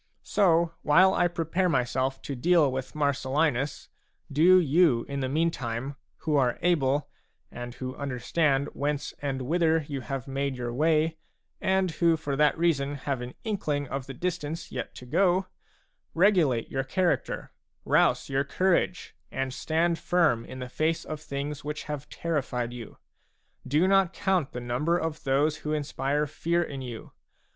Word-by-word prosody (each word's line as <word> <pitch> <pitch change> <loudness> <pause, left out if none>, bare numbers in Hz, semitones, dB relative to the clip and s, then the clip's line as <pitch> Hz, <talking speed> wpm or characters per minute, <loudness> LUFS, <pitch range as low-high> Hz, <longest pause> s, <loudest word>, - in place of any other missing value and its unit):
So 170 -4 +3
while 185 +6 +5
I 175 - +3
prepare 175 +2 0
myself 130 -1 0
to 140 - -4
deal 160 +1 +3
with 130 +1 -5
Marcellinus, 140 -1 0 0.4
do 175 +6 +6
you 155 -6 +3
in 140 0 -3
the 130 -1 -1
meantime, 135 -4 -1 0.3
who 150 -2 +2
are 125 -3 +2
able, 145 -5 +2 0.4
and 120 0 -7
who 130 0 -5
understand 140 +1 0
whence 145 0 -2
and 135 -2 -2
whither 160 +2 +2
you 140 -3 -4
have 135 +1 -5
made 135 0 -2
your 120 -1 -4
way, 155 +3 +2 0.4
and 190 -1 +2
who 165 +1 +2
for 145 -3 -3
that 150 +2 +3
reason 145 -4 +1
have 140 -2 -3
an 125 +1 -7
inkling 155 -10 -2
of 135 -1 -4
the 135 - -7
distance 165 0 -4
yet - - -5
to 125 - -10
go, 185 +7 +2 0.7
regulate 165 - +3
your 135 0 -1
character, 175 +6 -1 0.3
rouse - - +3
your 135 0 +1
courage, 180 +4 0 0.2
and 135 -1 -2
stand 165 +4 0
firm 160 -11 +2
in - - -9
the 125 -1 -5
face 155 +5 -1
of 155 -1 -6
things 145 0 -5
which 150 +1 -4
have 150 -1 -6
terrified 130 -7 -2
you. 120 -3 -9 0.7
Do 155 +7 +3
not 195 -2 +3
count 185 -7 0
the 125 - -5
number 125 +8 0
of 160 -2 -3
those 145 +3 +2
who 150 - -3
inspire 145 0 -1
fear 170 +3 0
in 140 -4 -6
you. 120 -3 -8
145 Hz, 155 wpm, -27 LUFS, 135-170 Hz, 0.7 s, do